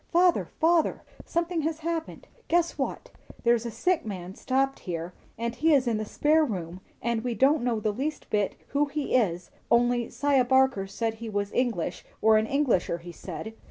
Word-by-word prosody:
"Father, 355 +1 +4
father! 330 0 +2 0.2
something 340 0 -1
has 320 +1 -2
happened. 330 0 -4 0.2
Guess 340 0 +2
what. - - -4 0.3
There's 235 -1 +3
a - - -3
sick 360 - 0
man 185 -4 -6
stopped 270 +4 0
here, 170 0 -5 0.2
and 235 +1 -2
he 315 +3 +3
is 265 -2 +3
in 235 -3 +1
the 215 - -3
spare 310 +8 +3
room, 185 - -4 0.2
and 235 -1 0
we 245 -2 -2
don't 275 +3 +4
know 240 -2 0
the 215 0 -1
least 295 +7 -3
bit 205 -2 +1
who 285 +1 +2
he 290 0 -3
is; 180 -8 +1 0.2
only 240 0 +3
'Siah 280 -3 +2
Barker 260 -6 +3
said 225 +3 -2
he 225 0 -7
was 205 -1 -2
English, 240 -9 -1 0.2
or 220 0 +5
an 220 - -1
'Englisher,' 255 -12 +1
he 175 - -8
said. 180 +5 -7
240 Hz, 185 wpm, -27 LUFS, 210-295 Hz, 0.3 s, or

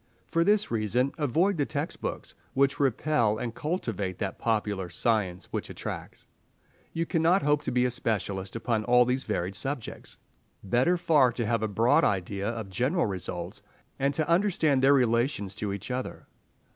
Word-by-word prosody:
For 165 - +1
this 210 +2 +2
reason 120 +4 +1
avoid 165 +7 +2
the 145 - +1
text 150 +2 -4
books, - - -5 0.2
which 140 +1 +2
repel, 125 -4 +2
and 115 0 -4
cultivate 115 - -3
that 95 -2 -4
popular 105 -5 -1
science 95 -2 0
which - - -3
attracts. - - -7 0.7
You 165 +1 -1
cannot 170 +3 +2
hope 150 0 +2
to - - -3
be 125 0 +2
a 125 - +1
specialist 100 -5 -2
upon 115 -1 -1
all 125 +1 +5
these 130 +2 -1
varied 95 -3 -2
subjects. 135 +2 -5 0.5
Better 125 - +2
far 155 -7 +4
to 120 -1 -2
have 115 0 0
a 110 - 0
broad 115 +4 +3
idea 100 +1 0
of 110 -4 -5
general 135 - +1
results, 90 +1 -5 0.4
and 140 +1 +2
to 155 0 0
understand 170 -6 +2
their 135 +2 +6
relations 115 -5 +1
to 105 0 -3
each 100 +5 -5
other. 130 0 -4
120 Hz, 165 wpm, -28 LUFS, 105-145 Hz, 0.7 s, their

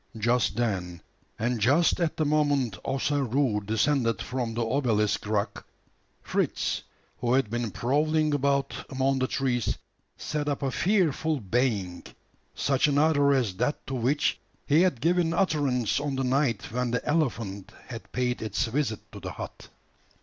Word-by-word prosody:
Just 120 0 +1
then, 95 -7 -2 0.4
and 120 +1 -1
just 145 - +3
at 170 -3 0
the 155 - +1
moment 145 -7 +2
Ossaroo 135 -4 0
descended 115 +1 +1
from 120 -3 -3
the 120 0 0
obelisk 115 -6 +1
rock, 105 -1 -1 0.6
Fritz, - - -1 0.4
who 120 0 +1
had 130 -5 +2
been 120 -1 -1
prowling 150 +6 +1
about 140 -2 +1 0.2
among 135 0 +1
the 130 - +1
trees, 125 -4 0 0.4
set 150 -1 -2
up 145 0 -2
a 135 - 0
fearful 160 - +1
baying 105 -5 -1 0.5
such 135 0 +2
another 145 0 +3
as 125 -9 +1
that 125 +6 -1
to 135 - -5
which 130 +4 +1 0.3
he 150 +4 +4
had 180 -10 +2
given 170 +1 +2
utterance 145 - +1
on 145 -1 -2
the 135 - -1
night 130 -2 0
when 125 +1 -1
the 120 0 -2
elephant 115 - -1
had 115 -3 -9
paid 125 -1 -1
its 110 +3 -1
visit 120 -2 -1
to - - -9
the - - -6
hut. - - -8
130 Hz, 150 wpm, -27 LUFS, 115-145 Hz, 0.6 s, he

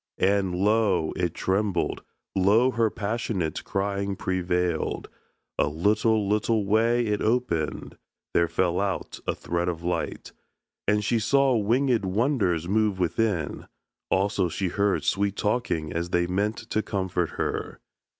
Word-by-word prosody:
And 95 -1 +2
lo! 100 -4 +2
it 90 -3 -1
trembled, 95 -2 0 0.3
lo! 105 +7 +4
her 115 -3 +2
passionate 100 -6 -2
Crying 100 0 -2
prevailed. 90 -3 -1 0.5
A - - +3
little 105 +7 +2
little 105 +1 +1
way 115 +4 +3
It 105 -1 -1
opened: 85 - -1 0.3
there 85 - +3
fell 90 0 0
out 100 -2 -2
a - - 0
thread 85 +1 -2
of 85 -1 -5
light, 90 +1 -3 0.6
And 105 0 +2
she 115 - +2
saw 135 +4 +3
wingèd 120 +2 +2
wonders 95 - +1
move 105 0 +1
within; 90 -2 -1 0.4
Also 95 -1 +1
she 90 +3 -2
heard 100 +2 +1
sweet 100 0 +1
talking 105 -9 -1
as 85 +1 -2
they 85 0 +2
meant 100 +5 -1
To 110 - +2
comfort 95 -4 -1
her. - - -3
100 Hz, 130 wpm, -26 LUFS, 90-110 Hz, 0.6 s, lo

